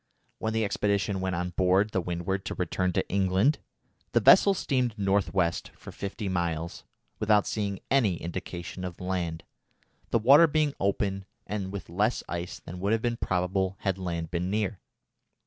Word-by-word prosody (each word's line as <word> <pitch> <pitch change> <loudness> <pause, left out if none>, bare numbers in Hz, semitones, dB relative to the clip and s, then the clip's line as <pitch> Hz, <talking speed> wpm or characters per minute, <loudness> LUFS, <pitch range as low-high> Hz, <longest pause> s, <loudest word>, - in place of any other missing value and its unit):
When 110 0 -1
the 110 -1 +1
expedition 100 -1 0
went 95 -1 -1
on 90 +1 -2
board 95 +4 +2
the 95 - 0
Windward 90 +2 -2
to - - -4
return 90 +1 0
to - - 0
England, 100 - +2 0.5
the - - +5
vessel 200 -1 +7
steamed 125 - 0
north 100 0 +1
west 85 -3 0
for - - -10
fifty 100 +1 -5
miles 85 -3 -2 0.4
without 105 -1 +3
seeing 100 -3 -2
any 120 -10 +3
indication 85 +2 -6
of 90 -2 -6
land, 90 -3 -3 0.7
the - - +3
water 140 +9 +7
being 155 -2 +1
open 95 0 0 0.2
and 100 -2 -4
with 100 -1 -6
less 105 +7 0
ice 85 +1 -5
than 90 +1 -8
would 100 +4 +1
have 115 - 0
been 120 -1 0
probable 95 0 0
had 95 -1 -1
land 85 -3 -3
been 90 +1 -1
near. 105 -1 -1
95 Hz, 165 wpm, -28 LUFS, 90-105 Hz, 0.7 s, vessel